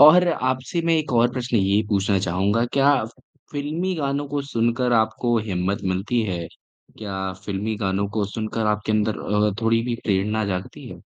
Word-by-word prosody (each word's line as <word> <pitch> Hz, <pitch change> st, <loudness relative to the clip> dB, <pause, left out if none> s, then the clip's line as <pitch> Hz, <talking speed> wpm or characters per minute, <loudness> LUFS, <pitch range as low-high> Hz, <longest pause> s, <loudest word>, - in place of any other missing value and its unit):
और 175 Hz, +5 st, +8 dB
आपसे 130 Hz, +2 st, -1 dB
मैं 165 Hz, -, +4 dB
एक 155 Hz, -4 st, -2 dB
और 120 Hz, 0 st, +4 dB
प्रश्न 125 Hz, -2 st, -1 dB
ये 100 Hz, +1 st, +3 dB
पूछना 100 Hz, -1 st, +2 dB
चाहूँगा, 95 Hz, +5 st, +1 dB
क्या 140 Hz, +1 st, +5 dB, 0.6 s
फ़िल्मी 155 Hz, +6 st, -2 dB
गानों 140 Hz, -1 st, -1 dB
को 145 Hz, 0 st, -2 dB
सुनकर 120 Hz, +2 st, +1 dB
आपको 115 Hz, +1 st, +2 dB
हिम्मत 95 Hz, +2 st, -1 dB
मिलती 105 Hz, +6 st, 0 dB
है? 90 Hz, -5 st, -3 dB, 0.5 s
क्या 95 Hz, -3 st, -4 dB
फ़िल्मी 105 Hz, +2 st, -2 dB
गानों 100 Hz, -1 st, -1 dB
को 105 Hz, -, +2 dB
सुनकर 110 Hz, +1 st, -3 dB
आपके 105 Hz, +1 st, 0 dB
अंदर 105 Hz, 0 st, +1 dB
अ, 105 Hz, 0 st, +1 dB
थोड़ी 115 Hz, 0 st, +3 dB
भी 120 Hz, 0 st, -2 dB
प्रेरणा 105 Hz, +2 st, +1 dB
जागती 90 Hz, -1 st, -5 dB
है? -, -, -10 dB
110 Hz, 165 wpm, -23 LUFS, 100-130 Hz, 0.6 s, और